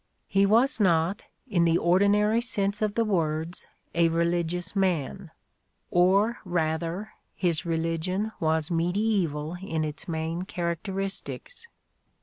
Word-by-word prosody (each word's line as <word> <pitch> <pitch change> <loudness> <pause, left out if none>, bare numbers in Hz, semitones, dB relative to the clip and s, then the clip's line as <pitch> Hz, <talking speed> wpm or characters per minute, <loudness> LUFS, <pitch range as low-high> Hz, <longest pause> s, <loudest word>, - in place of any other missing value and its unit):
He 195 0 +3
was 235 +5 +3
not, 175 +1 +2 0.3
in 185 -8 +2
the 165 0 +4
ordinary 205 +6 +3
sense 205 -4 -1
of 210 -1 0
the 230 - +2
words, 165 -4 -1 0.3
a 170 -1 +3
religious 170 +2 -1
man: 185 -1 0 0.6
or 195 +6 +3
rather, 170 +2 -2 0.2
his 170 -4 +1
reUgion 165 +5 -1
was 160 0 0
medieeval 175 -3 0
in 165 -5 -2
its 155 +4 -5
main 165 +1 -2
characteristics. 195 - -4
175 Hz, 115 wpm, -27 LUFS, 165-200 Hz, 0.6 s, the